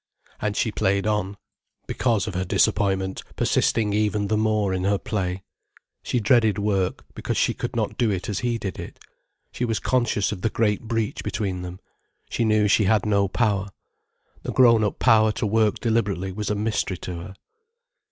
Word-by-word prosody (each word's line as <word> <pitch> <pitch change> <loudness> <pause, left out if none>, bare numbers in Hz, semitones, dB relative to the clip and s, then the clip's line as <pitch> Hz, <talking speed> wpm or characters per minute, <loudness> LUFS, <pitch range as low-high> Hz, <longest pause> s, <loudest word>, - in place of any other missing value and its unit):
And 105 -1 -2
she 110 - +1
played 100 -1 0
on, 105 -2 -1 0.5
because 115 -5 0
of 105 - -5
her 90 +1 -1
disappointment 95 +1 +1
persisting 105 -3 +1
even 105 -1 0
the 110 - +2
more 105 -2 +1
in 95 0 -2
her 100 +1 +2
play. 95 -3 -3 0.6
She 125 - -1
dreaded 110 -2 +3
work, 100 -3 -1
because - - -3
she - - +2
could - - -5
not - - -2
do 120 - +3
it 95 -3 -2
as 105 - -2
he 120 -1 -1
did 100 -4 -5
it. - - -8 0.5
She - - -4
was 115 -2 0
conscious 120 -5 0
of 100 -4 -5
the 110 - +1
great 105 -2 0
breach 115 -2 -2
between 100 -3 -3
them. 90 +1 -7 0.5
She - - 0
knew 110 -1 +3
she 105 +1 +3
had 105 +1 +2
no 100 -2 +2
power. 100 -2 0 0.7
The - - -4
grown 115 -3 +5
up 105 - -1
power 110 -3 +4
to 110 - -2
work 110 0 +2
deliberately 100 -5 -1
was 105 +2 -4
a 105 - 0
mystery 100 -3 -1
to 90 0 -6
her. 95 +3 -9
105 Hz, 180 wpm, -24 LUFS, 95-110 Hz, 0.7 s, grown